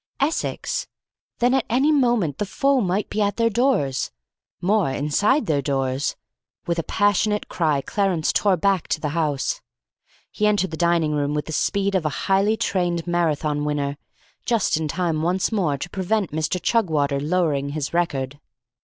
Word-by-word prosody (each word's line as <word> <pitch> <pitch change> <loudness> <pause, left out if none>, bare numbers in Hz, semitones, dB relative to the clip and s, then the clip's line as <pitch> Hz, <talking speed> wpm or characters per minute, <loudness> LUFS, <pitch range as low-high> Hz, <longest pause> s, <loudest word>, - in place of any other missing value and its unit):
Essex! - - -1 0.5
Then 245 +1 +2
at 265 -2 +2
any 265 +6 +3
moment 240 - +2
the 205 - 0
foe 275 +4 +2
might 190 +1 0
be 215 - -2
at 205 0 0
their 230 0 +2
doors; 215 - +1 0.5
more, 190 -2 +2
inside 200 - +1
their 150 -6 +1
doors. 135 0 -1 0.5
With 170 -2 -1
a - - -1
passionate 205 +2 +1
cry, 155 -5 +1
Clarence 190 -2 0
tore 200 -3 +3
back 195 0 +1
to - - -1
the 150 - -2
house. 155 - -1 0.7
He 210 - +1
entered 200 -4 +1
the - - -3
dining 170 -2 +2
room 145 0 0
with 150 - -2
the - - -7
speed 200 +4 0
of 190 -3 +1
a 145 - -4
highly 200 +3 +3
trained 175 -5 -1
Marathon 155 -4 0
winner, 145 -1 -1 0.5
just 230 -5 +1
in 155 0 -1
time 165 -1 -1
once 180 +5 0
more 175 -10 0
to 175 - -6
prevent 195 0 -1
Mr. 155 +4 -1
Chugwater 155 -9 +1
lowering 150 -3 0
his 145 0 -4
record. 145 -5 -1
175 Hz, 165 wpm, -23 LUFS, 150-210 Hz, 0.7 s, any